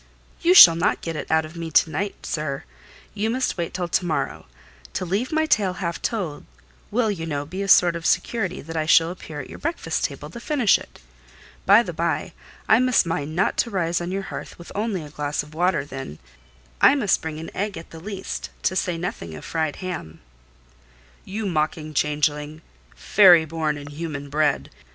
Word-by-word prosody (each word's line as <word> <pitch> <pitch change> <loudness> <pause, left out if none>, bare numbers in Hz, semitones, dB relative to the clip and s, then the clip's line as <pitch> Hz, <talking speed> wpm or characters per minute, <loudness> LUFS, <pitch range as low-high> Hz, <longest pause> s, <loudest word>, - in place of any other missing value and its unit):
"You 350 +2 +4
shall 170 - +11
not 170 +4 0
get 165 -1 -4
it - - -5
out 160 0 +2
of 155 +2 -12
me 165 -1 -5
to 160 0 +3
night, 195 +6 -4
sir; 145 -3 -3 0.5
you 215 +2 -1
must 255 +2 0
wait 170 -2 -3
till 180 -1 -3
to 175 - +1
morrow; 160 - -2 0.5
to - - -2
leave 200 +8 -1
my 315 0 +2
tale 205 -11 +2
half 170 -3 -4
told, 185 -11 -3 0.5
will, 225 0 +1
you 165 -5 -4
know, 145 -2 -3
be 185 +6 -6
a 200 - -2
sort 175 -3 +6
of 170 -1 -2
security 185 0 0
that 165 +2 -8
I 155 -1 -1
shall 165 0 +5
appear 160 -4 -8
at - - -10
your - - -9
breakfast 330 +3 -2
table - - -6
to 235 - -8
finish 250 -4 +3
it. - - -14 0.7
By - - +7
the - - -6
bye, - - -2 0.3
I 220 - +6
must 255 -5 +3
mind 155 -2 -3
not 190 - +1
to 235 - +1
rise 175 -4 -1
on 175 +1 -4
your 195 +1 -2
hearth - - -8
with 170 - -12
only 205 -5 -2
a 150 - -11
glass 145 -1 -2
of 150 +1 -15
water 170 -3 +1
then: 135 - -7 0.6
I 280 - +7
must 215 -9 +1
bring 155 -1 -5
an 160 - -9
egg 200 +1 -2
at 165 - -10
the 165 - -9
least, 195 +2 -6
to 185 - +1
say 180 -2 -1
nothing 85 - -5
of 75 - -10
fried 160 -2 -1
ham." 160 - -6 1.1
"You 210 +3 -4
mocking 155 -3 -1
changeling—fairy 150 +4 +2
born 155 -1 -2
and 145 0 -9
human 145 -2 -6
bred! 150 -1 +1
170 Hz, 195 wpm, -23 LUFS, 155-195 Hz, 1.1 s, shall